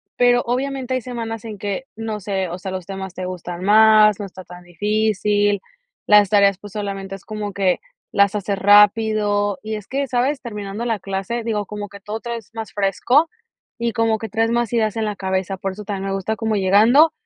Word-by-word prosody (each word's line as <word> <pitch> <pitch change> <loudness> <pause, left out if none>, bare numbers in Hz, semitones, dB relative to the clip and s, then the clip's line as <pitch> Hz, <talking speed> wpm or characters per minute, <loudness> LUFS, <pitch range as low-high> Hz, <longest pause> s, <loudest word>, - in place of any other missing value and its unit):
pero 245 0 +4
obviamente 260 +1 -2
hay 255 - -1
semanas 230 -2 -5
en 215 -2 -6
que, 205 +5 -4
no 220 -1 -4
sé, 190 -2 -2
o 175 - -5
sea, 190 +1 -6
los 185 -2 -5
temas 190 -1 -6
te 185 0 -5
gustan 180 -1 -6
más, 215 0 +6
no 205 - -4
está 185 -1 -10
tan 180 0 -12
difícil, 205 +2 +1 0.5
las 210 -2 +6
tareas, 200 -2 +4
pues, 205 -1 -11
solamente 195 -2 -4
es 195 - -13
como 210 -2 -5
que 190 -2 +1 0.3
las 200 -1 +3
haces 200 -1 -2
rápido. 205 0 +4
Y 220 0 -4
es 210 -2 -8
que, 275 +1 -2
¿sabes?, 260 +3 0
terminando 210 -1 -5
la 225 -4 -1
clase, 195 +5 -3
digo, 215 -2 -1
como 210 -1 -6
que 200 - -11
todo 210 +2 -5
traes 235 -3 -6
más 225 -1 -6
fresco, 245 - +2 0.5
y 235 0 0
como 225 -1 +1
que 225 - -6
traes 225 +3 +1
más 235 -2 0
ideas 220 -2 +1
en 220 - 0
la 210 -1 -2
cabeza, 190 0 -2
por 195 +1 -3
eso 210 +2 -8
también 195 -1 -4
me - - -1
gusta, 195 +3 -2
como 220 -1 -1
llegando, 215 - +5
210 Hz, 205 wpm, -21 LUFS, 195-225 Hz, 0.5 s, más